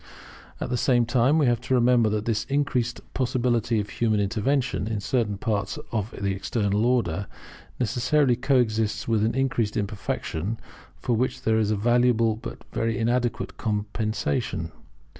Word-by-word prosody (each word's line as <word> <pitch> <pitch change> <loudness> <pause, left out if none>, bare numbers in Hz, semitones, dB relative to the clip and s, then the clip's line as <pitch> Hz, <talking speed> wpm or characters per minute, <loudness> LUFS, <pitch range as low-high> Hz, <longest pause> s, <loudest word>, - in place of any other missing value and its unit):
At - - -4
the 125 - +1
same 120 -1 +3
time 125 +5 +3
we 155 - +3
have 120 -2 +2
to 130 - 0
remember 120 -2 +4
that 105 0 -1
this 115 -2 0
increased 135 -4 0
possibility 120 -3 +1
of 105 0 -4
human 110 -3 +1
intervention 115 +3 0
in 110 -2 -2
certain 105 -1 0
parts 100 0 -2
of 110 -2 -1
the 100 0 0
External 100 +1 0
Order 100 -7 0 0.5
necessarily 125 +3 +2
coexists 115 -4 +1
with 110 -2 +2
increased 125 -5 0
imperfection, 100 -1 -3 0.4
for 120 - 0
which 130 +3 0
it - - -4
is 110 -2 +2
a 110 - +2
valuable 115 0 +3
but 110 - -8
very 115 -1 0
inadequate 120 0 -1
compensation. 105 -7 -2
115 Hz, 145 wpm, -25 LUFS, 105-125 Hz, 0.5 s, remember